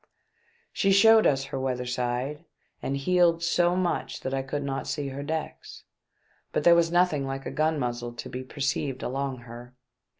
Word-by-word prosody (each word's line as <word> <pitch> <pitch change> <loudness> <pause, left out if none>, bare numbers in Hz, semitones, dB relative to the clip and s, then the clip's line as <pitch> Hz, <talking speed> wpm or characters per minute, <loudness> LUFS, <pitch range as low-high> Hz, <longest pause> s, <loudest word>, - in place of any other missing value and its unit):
She 195 - +2
showed 220 +3 +7
us 135 -1 +1
her 135 0 -5
weather 125 -1 -2
side, 125 +5 -2 0.4
and 140 - -2
heeled 170 +2 +2
so 175 +1 +2
much 180 -1 -2
that 130 - -4
I 135 - 0
could 140 +2 -4
not 135 -1 -3
see 140 -1 -3
her 135 +1 -6
decks, 160 +2 -5 0.7
but - - -1
there 170 - +7
was 170 -1 +3
nothing 175 -6 +2
like 135 0 -5
a - - -4
gun 155 +1 +1
muzzle 120 -2 -3
to 120 - -7
be 125 - -5
perceived 135 0 -2
along 135 -1 -3
her. 120 +1 -11
140 Hz, 175 wpm, -27 LUFS, 130-165 Hz, 0.7 s, showed